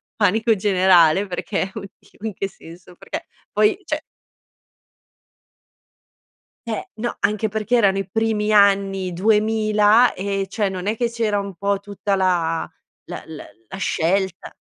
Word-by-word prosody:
panico 220 +2 +2
generale 185 -2 +4
perché:" 190 +1 -3
Oh 215 - -5 0.2
Dio, 220 - -10
in 210 - -4
che 195 - -3
senso?" 175 +1 -15
Perché, - - -7 0.3
poi, 215 - +2
cioè - - -2 2.7
Eh 220 - -4
no, 235 +2 -3
anche 215 +1 +1
perché 220 +3 -1
erano 195 -3 +3
i 195 -1 -5
primi 215 0 0
anni 195 -3 +3
2000, 215 +3 +3
e, 195 0 -2
cioè 200 -1 -1
non 185 +1 -5
è 215 - 0
che 240 -1 0
c'era 225 -3 -1
un 200 -2 -6
po' 200 +2 -1
tutta 200 0 -3
la 175 -3 0 0.4
la - - -7
la 160 -1 -9 0.2
la - - -7
scelta 190 +1 -1
200 Hz, 140 wpm, -21 LUFS, 190-215 Hz, 2.7 s, generale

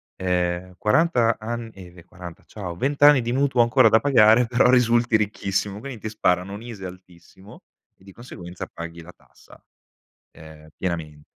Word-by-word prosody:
ehm, 90 0 -2
40 115 - +2
an 115 +1 -6
eh, 90 -2 -13
via, 90 -1 -16
40, 90 -1 -12
ciao, 90 -5 -8
20 140 +9 -2
anni 145 -3 +7
di 120 0 -3
mutuo 135 -1 +1
ancora 115 -1 +4
da 110 - +4
pagare, 120 -3 +4
però, 120 +1 +2
risulti 120 -2 +3
ricchissimo, 100 -1 -3
quindi, 130 -1 -8
ti 110 - -6
sparano, 95 -2 -1
un 105 - -9
ISEE 105 -6 -8
altissimo, 90 +2 -16 0.3
e 95 - -26
di 95 - -14
conseguenza, 90 -6 -10
paghi 85 0 -10
la 90 - -14
tassa, - - -21 0.7
ehm, 80 0 -15
pienamen 80 -5 -5
105 Hz, 165 wpm, -22 LUFS, 90-120 Hz, 0.7 s, anni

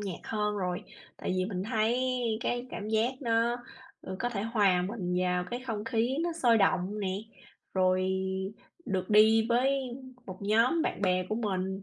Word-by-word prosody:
nhạc 195 -4 -4
hơn 210 -1 -1
rồi. 180 -2 -2 0.3
Tại - - -3
vì 185 - +1
mình 185 -2 -3
thấy 225 +2 +1 0.4
cái 245 0 -2
cảm 205 - -5
giác 220 +4 +1
nó, 235 0 +2 0.5
ừ, 190 - -6
có 245 - 0
thể 205 -4 -3
hòa 205 -6 +3
mình 185 -3 -3
vào 180 0 +1
cái 245 +1 -3
không 215 -3 -3
khí 240 +2 0
nó 340 0 0
sôi 245 -8 +3
động 195 +1 +1
nè, 195 - -1 0.7
rồi 185 0 +2 0.8
được 190 -2 -2
đi 220 +1 +6
với 265 +3 +2 0.5
một 185 -1 -7
nhóm 230 +10 +3
bạn - - -2
bè 185 -1 +2
của 215 - -1
mình 190 -3 -2
210 Hz, 175 wpm, -30 LUFS, 185-235 Hz, 0.8 s, đi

